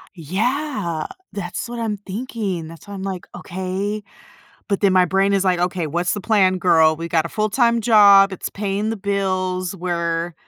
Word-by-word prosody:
Yeah, 195 Hz, -, -2 dB, 0.2 s
that's 185 Hz, +3 st, -5 dB
what 240 Hz, 0 st, -6 dB
I'm 220 Hz, -2 st, -2 dB
thinking. 200 Hz, -4 st, -4 dB
That's 165 Hz, +4 st, -13 dB
why 205 Hz, -, -8 dB
I'm 195 Hz, -, -6 dB
like, 190 Hz, -2 st, -5 dB
"Okay." 190 Hz, +3 st, -4 dB, 0.6 s
But 200 Hz, -1 st, -1 dB
then 195 Hz, -2 st, +4 dB
my 185 Hz, -1 st, +5 dB
brain 195 Hz, +3 st, +2 dB
is 195 Hz, -1 st, +2 dB
like, 185 Hz, -2 st, +2 dB
"Okay, 175 Hz, -2 st, -1 dB
what's 175 Hz, +4 st, -1 dB
the 205 Hz, -, -4 dB
plan, 190 Hz, -4 st, +3 dB
girl? 160 Hz, -3 st, +4 dB
We 165 Hz, +1 st, -5 dB
got 165 Hz, -1 st, +1 dB
a -, -, -5 dB
full-time 230 Hz, +3 st, +1 dB
job, 200 Hz, -3 st, +7 dB
it's 190 Hz, -, -5 dB
paying 205 Hz, +1 st, -2 dB
the 225 Hz, -, -4 dB
bills, 185 Hz, -2 st, -1 dB
we're 170 Hz, -1 st, -2 dB
190 Hz, 180 wpm, -21 LUFS, 175-205 Hz, 0.6 s, job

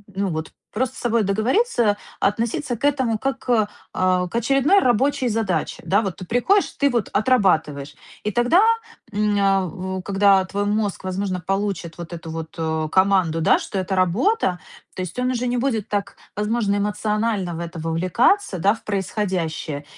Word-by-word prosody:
ну, 195 Hz, +1 st, 0 dB
вот 160 Hz, -1 st, -4 dB, 0.2 s
просто 250 Hz, +3 st, -1 dB
с -, -, -7 dB
собой 235 Hz, -2 st, +1 dB
договориться, 220 Hz, -, +1 dB, 0.2 s
относиться 230 Hz, +5 st, 0 dB
к -, -, -17 dB
этому, 260 Hz, -6 st, +1 dB
как 270 Hz, +3 st, -2 dB
к, 220 Hz, -4 st, +1 dB, 0.2 s
а, 185 Hz, -1 st, +1 dB
очередной 275 Hz, -, +3 dB
рабочей 255 Hz, -, +2 dB
задаче. 200 Hz, -7 st, -1 dB
Да, 200 Hz, +3 st, +3 dB
вот 195 Hz, -5 st, -4 dB
ты 185 Hz, -, -8 dB
приходишь, 380 Hz, -, +2 dB
ты 280 Hz, -, +3 dB
вот 235 Hz, -4 st, -1 dB
отрабатываешь, 180 Hz, -, +1 dB, 0.3 s
и 210 Hz, -, -1 dB
тогда, 245 Hz, -, +4 dB, 0.5 s
м, 210 Hz, 0 st, +1 dB
а, 190 Hz, -1 st, 0 dB
когда 195 Hz, -1 st, +4 dB
твой 200 Hz, +2 st, -2 dB
мозг, 205 Hz, -2 st, -1 dB
возможно, 185 Hz, 0 st, -2 dB
получит 195 Hz, -3 st, -2 dB
вот 170 Hz, 0 st, -8 dB
эту 165 Hz, -1 st, -7 dB
вот, 160 Hz, 0 st, -6 dB
э, 160 Hz, -1 st, -1 dB
команду, 190 Hz, -4 st, +3 dB
да, -, -, +5 dB
что 195 Hz, -, -4 dB
это 185 Hz, +1 st, -2 dB
работа, 185 Hz, -, +1 dB, 0.3 s
то -, -, -5 dB
есть 185 Hz, +4 st, -6 dB
он 250 Hz, +1 st, +1 dB
уже 250 Hz, 0 st, -1 dB
не 245 Hz, 0 st, 0 dB
будет 230 Hz, -4 st, -1 dB
так, 205 Hz, -1 st, -2 dB, 0.2 s
возможно, 210 Hz, 0 st, 0 dB
эмоционально 210 Hz, -2 st, -1 dB
в -, -, -6 dB
это 170 Hz, -1 st, -6 dB
вовлекаться, 185 Hz, -, +1 dB
да 200 Hz, +5 st, +4 dB
в -, -, -17 dB
происходящее, 185 Hz, -7 st, -2 dB
205 Hz, 165 wpm, -22 LUFS, 185-235 Hz, 0.5 s, да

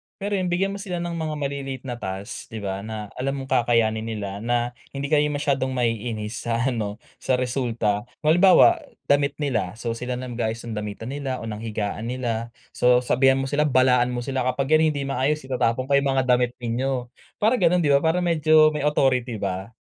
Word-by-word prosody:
Pero 205 Hz, +1 st, -4 dB
yun, 180 Hz, -, -1 dB
bigyan 195 Hz, +3 st, 0 dB
mo 200 Hz, -, -6 dB
sila 185 Hz, -3 st, -4 dB
ng 170 Hz, -, -3 dB
mga 160 Hz, -2 st, -3 dB
maliliit 140 Hz, -2 st, -4 dB
na 120 Hz, -2 st, -5 dB
task 95 Hz, +1 st, -6 dB
'di 110 Hz, -, -7 dB
ba 95 Hz, 0 st, -3 dB
na 110 Hz, 0 st, -6 dB
alam 135 Hz, +2 st, -1 dB
mong 135 Hz, 0 st, -7 dB
kakayanin 115 Hz, -2 st, +2 dB
nila, 100 Hz, -3 st, -4 dB
na 120 Hz, +1 st, 0 dB, 0.2 s
hindi 140 Hz, +2 st, -4 dB
kayo 150 Hz, -1 st, +4 dB
masyadong 140 Hz, -3 st, -1 dB
ma-iinis 115 Hz, -2 st, -2 dB
sa 115 Hz, 0 st, 0 dB
ano 105 Hz, -3 st, -3 dB, 0.3 s
sa 130 Hz, -, +1 dB
resulta. 120 Hz, -5 st, -1 dB, 0.2 s
Kung 155 Hz, -, +4 dB
halimbawa, 195 Hz, -, +6 dB, 0.3 s
damit 140 Hz, 0 st, +2 dB
nila 110 Hz, -10 st, -1 dB
so 115 Hz, 0 st, -3 dB
sila 125 Hz, +2 st, -4 dB
na 130 Hz, -, -5 dB
mag-aayos 115 Hz, -1 st, -3 dB
ng 115 Hz, -, -5 dB
damitan 105 Hz, +3 st, -5 dB
nila 135 Hz, -2 st, -3 dB
o -, -, -5 dB
ng 105 Hz, -1 st, -5 dB
higaan 110 Hz, 0 st, -3 dB
nila. 120 Hz, -2 st, -3 dB, 0.2 s
So 125 Hz, 0 st, +4 dB
sabihan 135 Hz, +2 st, +3 dB
mo 135 Hz, -, -1 dB
sila, 150 Hz, +2 st, +1 dB
balaan 125 Hz, -2 st, +4 dB
mo 120 Hz, -1 st, -3 dB
sila 135 Hz, 0 st, -1 dB
kapag 135 Hz, +3 st, -1 dB
yan 155 Hz, 0 st, +5 dB
hindi 145 Hz, -2 st, -2 dB
maayos 140 Hz, +2 st, 0 dB
itatapon 130 Hz, -1 st, 0 dB
ko 140 Hz, -, -8 dB
yung 140 Hz, 0 st, 0 dB
mga 130 Hz, -, +3 dB
damit 125 Hz, -1 st, +2 dB
ninyo, 125 Hz, +1 st, -2 dB, 0.3 s
para 225 Hz, +3 st, +2 dB
ganon 175 Hz, -1 st, +3 dB
di 145 Hz, -, +3 dB
ba? 140 Hz, -, +6 dB
Parang 165 Hz, +2 st, +1 dB
medyo 155 Hz, -2 st, +5 dB
may 150 Hz, -, -2 dB
authority 125 Hz, -5 st, +1 dB
ba. 95 Hz, 0 st, -3 dB
130 Hz, 205 wpm, -24 LUFS, 115-145 Hz, 0.3 s, halimbawa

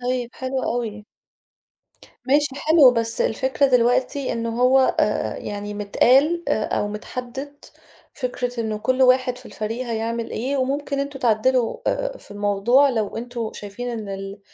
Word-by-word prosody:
طيب، 245 Hz, -1 st, -2 dB
حلو 260 Hz, 0 st, -3 dB
أوي. 220 Hz, -3 st, -3 dB, 1.2 s
ماشي 290 Hz, +2 st, +3 dB
حلو، 300 Hz, -2 st, +6 dB
بس 230 Hz, -1 st, 0 dB
الفكرة 265 Hz, +4 st, +1 dB
دلوقتي 255 Hz, +2 st, +2 dB
إنه 230 Hz, 0 st, -3 dB
هو 260 Hz, +1 st, +5 dB, 0.2 s
آآ -, -, 0 dB
يعني 205 Hz, 0 st, -5 dB
متقال 265 Hz, +11 st, +3 dB
آآ 215 Hz, -, +1 dB
أو 205 Hz, -, -1 dB
متحدّد 250 Hz, +6 st, -7 dB, 0.5 s
فكرة 245 Hz, -2 st, -3 dB
إن 220 Hz, -2 st, -2 dB
كل 255 Hz, +4 st, +1 dB
واحد 255 Hz, -1 st, +3 dB
في 250 Hz, -, -13 dB
الفريق 225 Hz, +4 st, -4 dB
هيعمل 230 Hz, 0 st, -3 dB
إيه 265 Hz, +5 st, -2 dB
وممكن 280 Hz, +2 st, -1 dB
أنتم 280 Hz, -1 st, -4 dB
تعدّلوا 240 Hz, +1 st, +2 dB
آآ -, -, -1 dB
في -, -, -17 dB
الموضوع 205 Hz, +7 st, +3 dB
لو 220 Hz, -6 st, -2 dB
أنتم 235 Hz, -1 st, -4 dB
شايفين 205 Hz, +4 st, -7 dB
إن 220 Hz, -3 st, -5 dB
ال 195 Hz, +1 st, -6 dB
245 Hz, 145 wpm, -22 LUFS, 220-265 Hz, 1.2 s, حلو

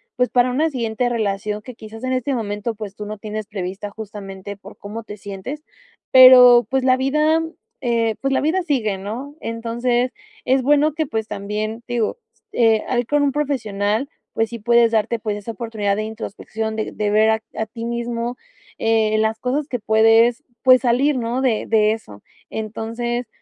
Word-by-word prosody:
pues 250 Hz, 0 st, +1 dB
para 245 Hz, 0 st, +3 dB
una 305 Hz, +6 st, +1 dB
siguiente 245 Hz, -3 st, -1 dB
relación 210 Hz, -2 st, -2 dB
que 250 Hz, +4 st, -10 dB
quizás 220 Hz, +1 st, -11 dB
en 255 Hz, 0 st, -1 dB
este 255 Hz, +2 st, -1 dB
momento, 210 Hz, -1 st, -3 dB
pues, 205 Hz, -2 st, -7 dB
tú 210 Hz, -, -7 dB
no 215 Hz, +1 st, -6 dB
tienes 215 Hz, 0 st, -5 dB
prevista 195 Hz, +1 st, -5 dB
justamente 200 Hz, -2 st, -8 dB
por 200 Hz, +1 st, -14 dB
cómo 215 Hz, +3 st, -7 dB
te 210 Hz, -1 st, -9 dB
sientes, 205 Hz, +9 st, -7 dB, 0.5 s
pero 250 Hz, -2 st, +9 dB
pues 265 Hz, 0 st, 0 dB
la 255 Hz, 0 st, +4 dB
vida, 300 Hz, +5 st, +2 dB, 0.4 s
eh, 230 Hz, -3 st, +1 dB
pues 270 Hz, 0 st, 0 dB
la -, -, +2 dB
vida 320 Hz, +6 st, +1 dB
sigue, 240 Hz, -, 0 dB
¿no? 240 Hz, +9 st, -6 dB
Entonces 240 Hz, +2 st, -1 dB, 0.3 s
es 265 Hz, +1 st, +3 dB
bueno 295 Hz, +2 st, +3 dB
que 315 Hz, 0 st, -1 dB
pues 220 Hz, -5 st, -3 dB
también 215 Hz, +3 st, -4 dB
digo, 240 Hz, -, -1 dB, 0.3 s
eh, 225 Hz, -2 st, +3 dB
ahí 245 Hz, -1 st, +1 dB
con 295 Hz, +5 st, +1 dB
un 280 Hz, -, +2 dB
profesional, 225 Hz, -4 st, -1 dB, 0.2 s
pues 225 Hz, 0 st, 0 dB
sí, 235 Hz, -, -6 dB
puedes 235 Hz, +1 st, +4 dB
darte 225 Hz, +1 st, +1 dB
esa 210 Hz, +1 st, -3 dB
oportunidad 215 Hz, -2 st, -2 dB
de 215 Hz, -, -2 dB
introspección, 220 Hz, 0 st, -5 dB
de 220 Hz, -, -3 dB
de 210 Hz, -1 st, -1 dB
ver 215 Hz, +1 st, +4 dB
a 220 Hz, -, 0 dB
a 220 Hz, -, -1 dB
ti 230 Hz, +1 st, -8 dB
mismo, 235 Hz, +1 st, -3 dB, 0.4 s
eh, 220 Hz, -1 st, +2 dB
las 220 Hz, 0 st, 0 dB
cosas 275 Hz, +3 st, -1 dB
que 250 Hz, -5 st, -3 dB
puedes, 225 Hz, +4 st, +4 dB, 0.2 s
pues 255 Hz, -1 st, +7 dB
salir, 260 Hz, +3 st, +2 dB
¿no?, 240 Hz, +1 st, -1 dB
de 245 Hz, -5 st, +1 dB
de 215 Hz, -1 st, +3 dB
eso. 105 Hz, -, -7 dB, 0.3 s
Entonces, 230 Hz, +2 st, -4 dB
230 Hz, 175 wpm, -21 LUFS, 215-255 Hz, 0.5 s, pero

